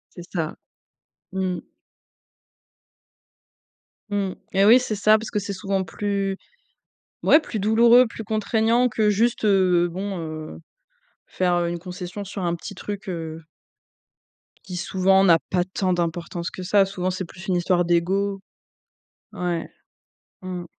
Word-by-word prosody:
C'est 175 Hz, 0 st, -10 dB
ça. 165 Hz, -4 st, -3 dB, 0.8 s
Mmh 190 Hz, -1 st, -1 dB
mh. -, -, -8 dB, 2.5 s
Mmh 205 Hz, -, -2 dB, 0.2 s
mh, -, -, -10 dB, 0.2 s
eh 195 Hz, +1 st, +4 dB
oui, 235 Hz, +4 st, +8 dB
c'est 220 Hz, -4 st, -3 dB
ça 215 Hz, +2 st, +5 dB
parce 220 Hz, -, -7 dB
que 210 Hz, -, 0 dB
c'est 200 Hz, 0 st, -4 dB
souvent 195 Hz, 0 st, -1 dB
plus 195 Hz, 0 st, -2 dB, 0.9 s
ouais, 310 Hz, -, +6 dB
plus 230 Hz, -, -5 dB
douloureux, 235 Hz, +4 st, +6 dB
plus 225 Hz, 0 st, -8 dB
contraignant 225 Hz, +3 st, +2 dB
que 215 Hz, -2 st, +1 dB
juste, 225 Hz, +3 st, +1 dB
heu, 185 Hz, -4 st, +3 dB
bon, 190 Hz, +1 st, -4 dB
heu, 155 Hz, -1 st, -6 dB, 0.7 s
faire, 180 Hz, -1 st, 0 dB
heu, 170 Hz, -1 st, 0 dB
une 175 Hz, -, -3 dB
concession 180 Hz, +2 st, -7 dB
sur 195 Hz, 0 st, -6 dB
un 170 Hz, 0 st, 0 dB
petit 200 Hz, +4 st, -8 dB
truc, 205 Hz, +2 st, -6 dB
heu 165 Hz, -2 st, -5 dB, 1.3 s
qui 185 Hz, -, -6 dB
souvent 190 Hz, +1 st, +3 dB
n'a 170 Hz, -3 st, +6 dB
pas 180 Hz, -1 st, +1 dB
tant 185 Hz, 0 st, -1 dB
d'importance 170 Hz, 0 st, -3 dB
que -, -, -8 dB
ça, 195 Hz, +2 st, +4 dB
souvent 185 Hz, -1 st, -3 dB
c'est 185 Hz, 0 st, -4 dB
plus 185 Hz, +3 st, -12 dB
une 185 Hz, -, +1 dB
histoire 175 Hz, 0 st, +2 dB
d'ego. 190 Hz, +4 st, +1 dB, 0.9 s
Ouais. 175 Hz, -2 st, -2 dB, 0.7 s
Mmh. 180 Hz, -1 st, -5 dB
190 Hz, 145 wpm, -23 LUFS, 175-205 Hz, 2.5 s, oui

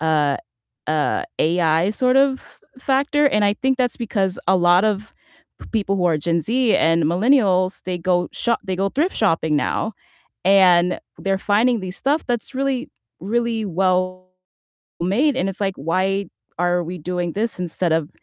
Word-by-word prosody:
uh, 150 Hz, -3 st, +1 dB, 0.5 s
uh, 155 Hz, -1 st, 0 dB, 0.2 s
AI 165 Hz, +1 st, +2 dB
sort 255 Hz, +3 st, +1 dB
of 270 Hz, -1 st, -1 dB, 0.2 s
factor, 280 Hz, +2 st, +1 dB
and 210 Hz, -5 st, +1 dB
I 205 Hz, 0 st, +2 dB
think 265 Hz, +3 st, 0 dB
that's 250 Hz, -2 st, 0 dB
because 200 Hz, -5 st, -1 dB
a 190 Hz, -, +5 dB
lot 175 Hz, +3 st, +4 dB
of 215 Hz, 0 st, -2 dB, 0.6 s
people 200 Hz, -3 st, 0 dB
who 180 Hz, -, -1 dB
are 160 Hz, -3 st, +1 dB
Gen 165 Hz, +1 st, 0 dB
Z 240 Hz, -, +2 dB
and 165 Hz, 0 st, +2 dB
millennials, 185 Hz, -, +2 dB
they 180 Hz, -1 st, -3 dB
go 175 Hz, 0 st, 0 dB
sho 235 Hz, -1 st, 0 dB
they 190 Hz, -2 st, -3 dB
go 195 Hz, +1 st, 0 dB
thrift 325 Hz, +7 st, -1 dB
shopping 165 Hz, -7 st, +1 dB
now, 220 Hz, +8 st, -1 dB, 0.5 s
and 180 Hz, -2 st, +4 dB, 0.2 s
they're 195 Hz, -1 st, -1 dB
finding 225 Hz, +4 st, +2 dB
the 185 Hz, -1 st, -5 dB
stuff 285 Hz, +9 st, -1 dB
that's 240 Hz, +2 st, -3 dB
really, 270 Hz, 0 st, -2 dB, 0.3 s
really 225 Hz, +2 st, -1 dB
well 185 Hz, 0 st, -1 dB, 0.7 s
made, 250 Hz, -, +1 dB
and 195 Hz, -, 0 dB
it's 195 Hz, -, -7 dB
like, 195 Hz, -2 st, -1 dB
"Why 190 Hz, +6 st, -1 dB, 0.3 s
are 175 Hz, 0 st, +1 dB
we 180 Hz, +2 st, -6 dB
doing 175 Hz, +1 st, -3 dB
this 220 Hz, -1 st, -1 dB
instead 175 Hz, -1 st, -1 dB
of 160 Hz, -2 st, 0 dB
190 Hz, 160 wpm, -21 LUFS, 175-235 Hz, 0.7 s, a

